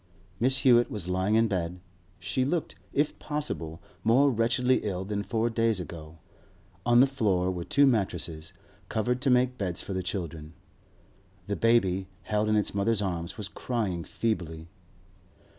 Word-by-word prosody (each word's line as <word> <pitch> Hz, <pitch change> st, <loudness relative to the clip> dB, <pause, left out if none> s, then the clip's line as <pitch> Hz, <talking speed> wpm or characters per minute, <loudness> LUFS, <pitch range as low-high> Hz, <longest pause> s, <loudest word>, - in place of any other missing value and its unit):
Mrs. 130 Hz, +2 st, +3 dB
Hewett 120 Hz, -3 st, +5 dB
was 100 Hz, -5 st, -4 dB
lying 95 Hz, +3 st, +1 dB
in 115 Hz, 0 st, +4 dB
bed; 90 Hz, -3 st, -2 dB, 0.4 s
she 95 Hz, +7 st, -1 dB
looked, 160 Hz, +5 st, -1 dB, 0.2 s
if 145 Hz, +1 st, 0 dB
possible, 145 Hz, -, -4 dB, 0.2 s
more 135 Hz, +5 st, +5 dB
wretchedly 125 Hz, +2 st, +2 dB
ill 95 Hz, -2 st, -3 dB
than 100 Hz, 0 st, -2 dB
four 115 Hz, +2 st, 0 dB
days 115 Hz, -3 st, +1 dB
ago. 80 Hz, -2 st, -8 dB, 0.7 s
On 120 Hz, 0 st, +6 dB
the -, -, +8 dB
floor 100 Hz, -9 st, +1 dB
were 90 Hz, -2 st, -4 dB
two 140 Hz, +1 st, +4 dB
mattresses, 90 Hz, -, -1 dB, 0.4 s
covered 125 Hz, +3 st, 0 dB
to 140 Hz, -, +2 dB
make 125 Hz, 0 st, +3 dB
beds 90 Hz, -4 st, -2 dB
for 100 Hz, -, -4 dB
the 95 Hz, -, -1 dB
children. 85 Hz, -4 st, -5 dB, 0.9 s
The 100 Hz, +1 st, -2 dB
baby, 95 Hz, -5 st, +2 dB, 0.2 s
held 105 Hz, +1 st, 0 dB
in 110 Hz, -, +3 dB
its 105 Hz, -, +1 dB
mother's 105 Hz, +1 st, +1 dB
arms, 85 Hz, -3 st, -3 dB
was 105 Hz, -3 st, -4 dB
crying 105 Hz, -9 st, -2 dB
feebly. 80 Hz, -5 st, -3 dB
105 Hz, 155 wpm, -28 LUFS, 90-120 Hz, 0.9 s, the